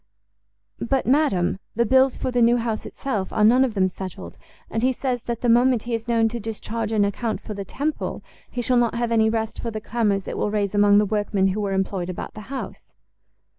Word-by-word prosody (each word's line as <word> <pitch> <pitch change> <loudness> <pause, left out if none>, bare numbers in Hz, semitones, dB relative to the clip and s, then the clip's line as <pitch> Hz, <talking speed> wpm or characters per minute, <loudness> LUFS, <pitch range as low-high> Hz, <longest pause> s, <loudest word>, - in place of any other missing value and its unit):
"But, 265 +2 0
madam, 230 - +2 0.2
the 235 +2 +2
bills 260 +2 +4
for 255 - -2
the 245 -1 +1
new 235 +1 +5
house 230 -2 -3
itself 210 -9 -3
are 215 - +1
none 245 +5 +6
of 245 -5 -1
them 190 -1 +3
settled, 180 - -8 0.3
and 225 - -2
he 255 +2 +3
says 255 -1 -2
that 235 -1 -4
the 245 - 0
moment 240 0 +4
he 240 - -4
is 225 +1 -3
known 230 -1 +3
to 235 +1 -5
discharge 225 0 -4
an 210 -2 +3
account 215 +2 -2
for 215 - -7
the 200 -1 -5
Temple, 295 - -3 0.3
he 245 - -4
shall 250 +1 +2
not 240 -1 +2
have 235 0 -1
any 220 -1 +4
rest 220 0 -2
for 235 - -3
the 220 -1 -4
clamours 210 -3 -1
it - - -4
will - - 0
raise 205 -2 -1
among 205 0 +5
the 210 - +4
workmen 205 -2 +1
who 205 +3 -2
were 200 -1 -1
employed 190 -2 -1
about 180 - -6
the 215 - -9
house." 270 -1 -6
225 Hz, 225 wpm, -23 LUFS, 205-240 Hz, 0.3 s, none